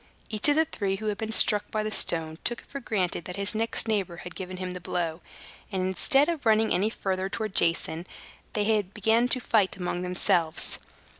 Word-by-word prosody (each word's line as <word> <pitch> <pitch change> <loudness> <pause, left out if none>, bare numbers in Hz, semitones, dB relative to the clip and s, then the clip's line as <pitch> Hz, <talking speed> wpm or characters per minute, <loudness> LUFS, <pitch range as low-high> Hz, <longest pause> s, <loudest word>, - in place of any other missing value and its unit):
Each 215 +6 +4
of 290 - +4
the 320 +1 +4
three 200 -11 -2
who 215 +3 -7
had 210 -1 -2
been 220 0 -3
struck 210 -2 +4
by 215 -1 -1
the 215 - -3
stone 160 -4 +1
took 240 - -2
it - - -23
for 280 - -6
granted 190 -9 -2
that 180 - -6
his 200 +1 0
next 225 +1 0
neighbor 195 -6 -1
had 180 0 -9
given 185 0 -6
him 185 0 -5
a - - -5
blow; 170 -1 -3 0.5
and 190 -2 -1
instead 270 - +3
of 335 -4 -2
running 220 -1 +3
any 200 +4 +2
farther 190 -3 -2
towards 215 -1 -4
Jason, 165 0 -1 0.5
they 210 0 +2
began 220 +5 +1
to 255 - +3
fight 215 -6 +1
among 180 -1 -3
themselves. 180 -2 +2
200 Hz, 205 wpm, -27 LUFS, 180-220 Hz, 0.5 s, Each